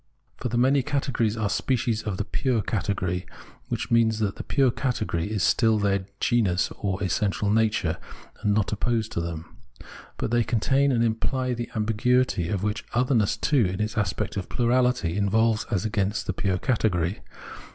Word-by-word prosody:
For 125 - -3
the 120 - -1
many 135 +3 +4
categories 130 -5 -1
are 110 -2 0
species 115 0 0
of 100 -4 -3
the 100 - -1
pure 120 -2 0
cate 100 -1 -1
gory, 90 0 -3 0.4
which - - -3
means 115 -2 +3
that 105 -3 -1
the - - -4
pure 135 -3 +2
category 110 -9 -2
is 105 -4 -1
still 110 -2 +3
their 100 -2 0
genus 105 -7 +1
or 100 0 -2
essential 100 +2 0
nature, 105 -7 +1 0.4
and 105 - +1
not 105 -1 +1
opposed 110 +1 -1
to - - -2
them. 85 -1 -6 0.6
But - - -2
they 120 0 +3
contain 135 +5 +2
and 115 -2 +2
imply 125 +3 0
the 120 0 -4
ambiguity 110 -3 +1
which 105 +2 -1
other 125 +3 +2
ness 110 -5 +2
too, 140 -8 +2
in 95 +1 -4
its 105 0 -2
aspect 105 -1 -1
of 95 - -4
plurality, 125 -7 +1
involves 110 +2 +2
as 100 -4 -1
against 100 -1 -1
the 95 - -2
pure 95 0 0
category. 100 - 0
110 Hz, 170 wpm, -25 LUFS, 100-120 Hz, 0.6 s, many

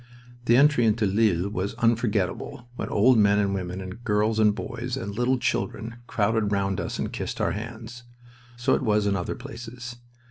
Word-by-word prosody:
The 120 0 +5
entry 140 -4 +5
into 110 0 +2
Lille 100 -3 +2
was 100 -1 -3
unforgetable, 115 0 0
when - - -4
old 115 +3 +4
men 100 -1 +4
and 100 -1 +1
women 90 -1 -3
and 95 +5 -8
girls 110 0 +1
and 105 -1 +4
boys 120 +3 -4
and 100 -6 -5
little 125 +4 +1
children 115 -1 -2
crowded 105 0 +1
round 100 -1 0
us - - -4
and - - -3
kissed - - -4
our - - +1
hands. 115 +3 -7 0.5
So 130 +3 +2
it - - +2
was 105 -4 +2
in 100 -1 +2
other 90 -2 -3
places. 120 -1 -8
110 Hz, 180 wpm, -25 LUFS, 100-120 Hz, 0.5 s, The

